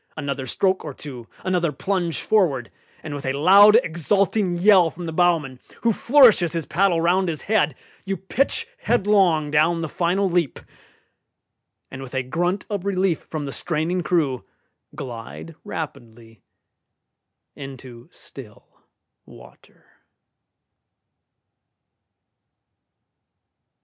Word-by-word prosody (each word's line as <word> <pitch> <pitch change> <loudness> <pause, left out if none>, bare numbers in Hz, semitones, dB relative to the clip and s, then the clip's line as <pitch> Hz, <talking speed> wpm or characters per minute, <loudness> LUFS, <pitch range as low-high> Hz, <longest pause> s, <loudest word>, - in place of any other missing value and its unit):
Another 140 -3 -4
stroke 190 +8 0
or 145 -4 -7
two, 125 -6 -10 0.2
another 180 -3 0
plunge 175 +2 -2
forward, 155 - +1 0.3
and 155 -2 -6
with 145 - -6
a 130 - -1
loud 195 +9 +6
exulting 185 +3 0
yell 185 -2 +5
from 175 +2 -9
the 165 - -4
bowman, 160 -7 +1 0.2
who 230 -1 +3
flourishes 235 - +4
his 165 -3 -3
paddle 180 0 +1
round 180 +2 +1
his 155 -2 -5
head, 190 -10 +1 0.3
you 195 -1 -3
pitch 230 +10 -1
headlong 190 -9 +2
down 165 +3 +2
the 160 - -3
final 180 +5 0
leap, 175 -6 -1 1.3
and 130 - -8
with 135 0 -9
a 130 - 0
grunt 175 +9 -2
of 200 -4 -4
relief 190 -4 0
from 155 -2 -6
the 140 - -5
straining 170 +4 -2
crew 150 -8 0 0.5
glide 125 +5 -8
rapidly 115 - -8 1.1
into 130 -2 -11
still 115 -6 -15 0.5
water. - - -18
165 Hz, 115 wpm, -22 LUFS, 140-190 Hz, 1.3 s, loud